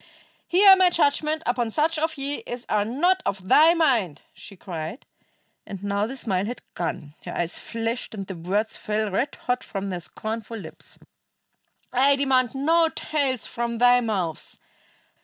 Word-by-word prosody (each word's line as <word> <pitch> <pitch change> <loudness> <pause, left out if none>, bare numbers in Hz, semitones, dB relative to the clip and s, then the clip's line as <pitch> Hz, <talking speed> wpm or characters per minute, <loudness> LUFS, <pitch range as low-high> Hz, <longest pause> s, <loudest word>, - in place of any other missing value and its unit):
"Hear 385 +2 +8
my 370 -1 +5
judgment 310 -1 +1
upon 240 -1 0
such 310 +6 +1
of 315 0 -1
ye 280 +1 -3
as 245 0 -5
are 205 -1 +2
not 350 - +2
of 190 -1 -3
thy 325 +3 +7
mind," 235 - +1
she 200 - -12
cried, 175 - -6 0.6
and 195 -1 -8
now 200 +1 0
the 265 +3 -7
smile 195 -5 -1
had 245 - -6
gone; 165 -3 -4
her - - -6
eyes 170 0 -1
flashed 230 0 -3
and 195 -2 -5
the 190 - -6
words 195 +6 -1
fell 215 0 -1
red 240 +9 -1
hot 250 0 -2
from 195 -1 -4
her 180 - -3
scornful 220 +6 -5
lips. 210 - -8 1.0
"I 275 +3 +5
demand 265 -3 +2
no 325 +4 +3
tales 275 -7 -1
from 235 0 -3
thy 245 +1 +5
mouths. 190 - -2
235 Hz, 160 wpm, -24 LUFS, 200-285 Hz, 1.0 s, Hear